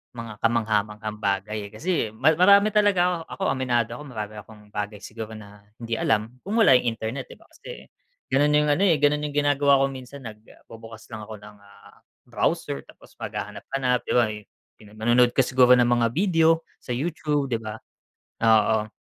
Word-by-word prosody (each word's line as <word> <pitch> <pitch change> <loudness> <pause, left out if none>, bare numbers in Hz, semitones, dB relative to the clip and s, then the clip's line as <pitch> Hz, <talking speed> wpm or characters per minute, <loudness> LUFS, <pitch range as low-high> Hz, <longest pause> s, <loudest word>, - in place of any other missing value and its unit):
mga 115 -2 -8
kamangha-manghang 110 -2 -1
bagay 100 +1 -2
eh. - - -17
Kasi 175 +11 -3 0.2
ma 140 +7 +4
marami 200 +3 +6
talaga, 185 -4 +2
ako - - -8
ako - - -14
aminado 120 -3 0
ako, - - -8
marami 110 -4 -6
akong 105 0 -15
bagay 105 0 -5
siguro 110 0 -8
na 105 -1 -13 0.2
hindi 115 -1 -4
alam 110 +3 -1
kung 200 - -5
wala 225 -11 +5
yung 125 -1 +4
internet, 115 +4 -5
'di - - -12
ba? - - -22
Kasi, - - -11 0.5
gano'n 145 +2 +3
yung 150 0 +3
ano 145 - +1
eh, 170 - +4
gano'n 150 +1 +1
yung 145 - -9
ginagawa 145 -1 +3
ko 135 - 0
minsan 135 +1 -10
nagbubukas 115 0 -13
lang 110 - -6
ako 110 - -8
ng, 105 0 -14
ah, 100 0 -19 0.3
browser, 70 - -2
tapos - - -18
maghahanap-hanap, 125 -2 -3
'di - - -1
ba 120 - +5 0.5
yung 105 -1 -16
manonood 120 +2 +4
ka - - 0
siguro 125 0 +4
ng 120 -1 +3
mga 120 -1 +2
video 165 -3 +3 0.2
sa 125 - -5
YouTube, 150 -1 -2
'di 115 - 0
ba? 110 -1 -7 0.7
Oo. 110 -1 +3
120 Hz, 180 wpm, -24 LUFS, 110-145 Hz, 0.7 s, marami